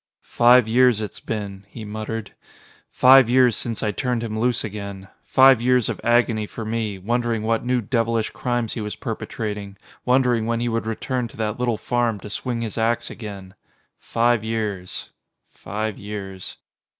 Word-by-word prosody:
"Five 120 0 +5
years 125 -1 +4
it's 105 -2 -6
been," 100 -3 -5
he 110 +2 -9
muttered. 110 +1 -5 0.6
"Five 130 -1 +6
years 125 -2 +5
since 115 -2 -3
I 105 - +1
turned 125 +2 -2
him 110 -2 -4
loose 120 +1 +1
again. 100 -2 -7 0.2
Five 130 -2 +6
years 125 -1 +3
of - - -4
agony 115 -2 +2
for 110 - -7
me, 110 -2 -2
wondering 115 +2 -1
what 115 0 0
new 125 0 +1
devilish 115 0 0
crimes 120 -3 -2
he 115 - -4
was 105 0 -4
perpetrating, 105 -2 -5 0.3
wondering 125 -3 +2
when 115 0 0
he 120 0 -1
would 115 -1 -2
return 125 +2 -2
to - - -16
that 110 +1 -2
little 120 -3 0
farm 120 -3 0
to 105 - -8
swing 120 +1 -3
his 115 0 -4
ax 115 +1 0
again. 100 -4 -8 0.5
Five 120 -1 +1
years 105 -5 -3 0.4
five 105 +2 -4
years." 100 -2 -7
115 Hz, 160 wpm, -22 LUFS, 105-120 Hz, 0.6 s, Five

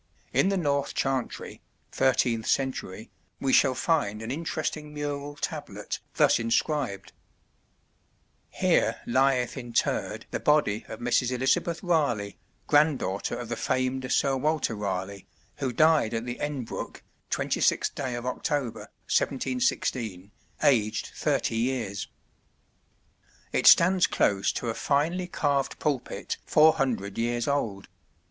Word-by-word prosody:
In 195 - +3
the 195 - +1
north 140 -4 0
Chantry 135 -2 -2 0.3
(13th 125 -4 +1
century) 120 -6 -2 0.3
we 135 -1 0
shall 130 -2 +5
find 115 -10 0
an 115 - -4
interesting 155 0 -3
mural 145 0 -4
tablet - - -5 0.2
thus - - +4
inscribed: 115 -1 -1 1.4
"Here - - +1
lieth 130 0 +2
Interred 120 -4 -1
the - - -2
Body 150 -8 +2
of - - -8
Mrs. 120 0 +2
Elizabeth 135 +7 0
Raleigh, 140 - 0 0.3
Grand 150 -1 +4
Daughter 95 -3 -3
of 120 - -6
the 120 - -3
FAMED 130 +2 -1
Sr 135 -1 +2
Walter 150 -2 0
Raleigh, 100 -1 -4 0.3
who 130 - -2
died 155 -3 +3
at 115 +1 -2
the 120 0 -5
Enbrook, 145 -5 -5 0.3
26 - - +1
day 125 -2 -4
of 120 0 -5
October, 125 0 -2 0.2
1716, 120 -6 -1 0.3
aged 110 -5 +2
30 - - 0
years." 115 -4 -2 1.4
It - - +2
stands 180 +1 +7
close 100 -1 +1
to 120 - -3
a - - -4
finely 160 +9 0
carved 140 -5 0
pulpit 140 -5 -2
four 155 +1 +6
hundred 115 -7 -2
years 120 0 0
old. 115 -9 -1
130 Hz, 120 wpm, -27 LUFS, 115-145 Hz, 1.4 s, stands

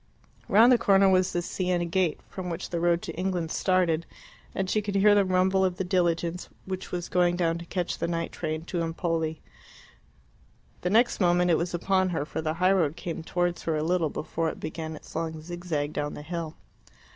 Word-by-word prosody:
Round 225 +5 +7
the 245 - +5
corner 195 0 +5
was 185 0 +3
the 175 - -1
Siena 180 -1 -1
gate, 170 -1 0
from 185 -2 -6
which 170 +2 -5
the 170 - -1
road 170 0 +2
to 165 - -5
England 180 -2 -2
started, 175 -3 +1 0.5
and 195 - -1
she 215 +3 +1
could 205 -1 -4
hear 205 +1 +6
the 205 -1 +5
rumble 190 +1 +2
of 185 -1 0
the - - -1
diligence 175 -1 0 0.2
which 190 0 -5
was 175 -1 -3
going 175 -1 +2
down 170 -1 0
to 170 - -8
catch 175 0 -3
the - - -1
night 165 -1 -2
train 155 -1 -4
to 175 -1 -2
Empoli. 165 -1 -2 1.4
The 180 - 0
next 230 +5 +3
moment 175 0 +3
it 165 - +4
was 170 +1 -2
upon 185 +1 +1
her, 160 -5 -2
for 160 - -4
the 155 0 -2
highroad 180 -4 +2
came 170 -1 -5
towards 175 +1 -1
her 160 -2 -1
a 150 - -1
little 170 -1 +1
before 160 +2 -2
it - - -7
began 160 0 -5
its - - -13
long 160 -1 -3
zigzag 160 -3 -3
down 145 0 -3
the 150 - -8
hill. 165 0 -5
175 Hz, 205 wpm, -27 LUFS, 165-185 Hz, 1.4 s, Round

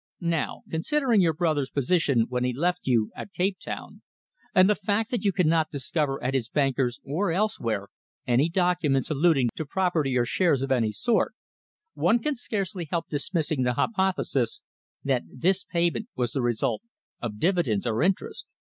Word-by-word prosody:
Now, 160 - -2
considering 235 - +2
your 165 -4 +2
brother's 155 -5 0
position 140 -3 +2
when 125 0 -1
he 125 0 0
left 175 +6 -1
you 115 -4 +2
at 195 - -8
Cape 185 +1 0
Town, - - -7 0.5
and 185 0 +7
the 210 - +5
fact 210 +3 -1
that 240 -4 -1
you 200 - +3
cannot 165 -4 +2
discover 140 -1 -2
at 130 +2 0
his 125 -4 -1
bankers 135 -3 0
or 170 +7 0
elsewhere 115 - -1 0.4
any 125 +6 +3
documents 175 -5 +1
alluding 145 -4 +3
to - - -4
property 155 -5 0
or 120 - +2
shares 145 -1 +2
of 135 - -3
any 115 -4 +2
sort, 235 - +1 0.6
one 230 - +3
can 300 +5 -1
scarcely 195 -7 -3
help 170 0 -2
dismissing 155 -1 -1
the 125 -1 +2
hypothesis 190 - 0 0.4
that 135 -3 +1
this 180 +8 0
payment 170 -8 0
was 120 -2 -1
the 135 - -1
result 120 - 0 0.4
of 110 -3 -4
dividends 160 - +1
or 115 0 0
interest. 185 +3 -1
160 Hz, 165 wpm, -26 LUFS, 130-185 Hz, 0.6 s, and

